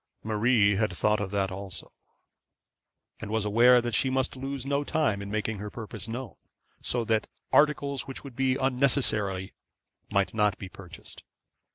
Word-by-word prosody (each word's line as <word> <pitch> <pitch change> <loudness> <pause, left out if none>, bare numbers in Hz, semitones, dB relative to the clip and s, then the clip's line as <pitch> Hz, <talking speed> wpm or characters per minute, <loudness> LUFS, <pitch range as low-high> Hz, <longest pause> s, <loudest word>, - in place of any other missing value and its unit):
Marie 110 -2 +3
had 110 0 +1
thought 105 0 +1
of 100 -2 -2
that 100 -1 0
also, 95 -1 -7 1.3
and - - -6
was 110 -1 0
aware 120 +4 +6
that 120 -1 -3
she 130 - +2
must 130 0 0
lose 135 0 -5
no 140 +1 0
time 140 -10 0
in 100 - -6
making 110 0 -2
her 105 +1 -5
purpose 110 -2 -7
known, 115 -3 -5 0.5
so 120 -2 +1
that 110 -1 +1 0.3
articles 145 -2 +3
which 135 - -5
would 135 -4 -10
be 130 0 +2
unnecessary 125 -8 +1 0.6
might 100 -1 +1
not 105 -3 +2
be 95 - -7
purchased. 90 -3 -10
110 Hz, 160 wpm, -28 LUFS, 100-130 Hz, 1.3 s, aware